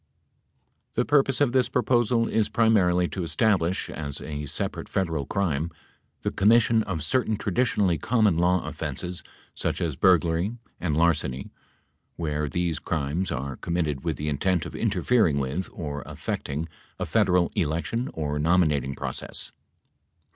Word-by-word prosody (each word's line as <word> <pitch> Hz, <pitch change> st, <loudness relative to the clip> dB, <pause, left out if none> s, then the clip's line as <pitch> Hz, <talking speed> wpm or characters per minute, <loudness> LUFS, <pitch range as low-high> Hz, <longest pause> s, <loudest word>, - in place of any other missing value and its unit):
The -, -, +1 dB
purpose 140 Hz, -2 st, +3 dB
of 140 Hz, -4 st, +4 dB
this 125 Hz, -1 st, +2 dB
proposal 120 Hz, -2 st, +2 dB
is 110 Hz, -2 st, +1 dB
primarily 90 Hz, -6 st, +3 dB
to 95 Hz, -, -4 dB
establish, 95 Hz, -1 st, +1 dB
as 70 Hz, -2 st, -5 dB
a 75 Hz, -1 st, -5 dB
separate -, -, -2 dB
Federal 80 Hz, -7 st, -1 dB
crime, 85 Hz, -6 st, 0 dB, 0.5 s
the -, -, 0 dB
commission 115 Hz, +2 st, +4 dB
of 85 Hz, -6 st, -3 dB
certain 110 Hz, +5 st, +1 dB
traditionally 100 Hz, -5 st, +1 dB
common 110 Hz, -6 st, +3 dB
law 90 Hz, +2 st, +2 dB
offenses 90 Hz, 0 st, -4 dB, 0.3 s
such -, -, -2 dB
as 80 Hz, -5 st, -1 dB
burglary 90 Hz, -, +2 dB, 0.2 s
and 80 Hz, -4 st, -1 dB
larceny 75 Hz, -6 st, +1 dB, 0.6 s
where 75 Hz, -3 st, -2 dB
these 85 Hz, -1 st, -1 dB
crimes 80 Hz, +4 st, -2 dB
are 70 Hz, -2 st, -3 dB
committed 80 Hz, -6 st, -2 dB
with -, -, -1 dB
the 75 Hz, -, -4 dB
intent 80 Hz, +3 st, +1 dB
of -, -, -7 dB
interfering 110 Hz, -12 st, +2 dB
with 70 Hz, +7 st, -2 dB
or 75 Hz, -3 st, -5 dB
affecting 75 Hz, +4 st, -4 dB, 0.3 s
a -, -, -2 dB
Federal 90 Hz, -1 st, +2 dB
election 85 Hz, -, -1 dB
or 75 Hz, -2 st, -2 dB
nominating 75 Hz, -5 st, +2 dB
process. -, -, -5 dB
85 Hz, 135 wpm, -26 LUFS, 75-105 Hz, 0.6 s, of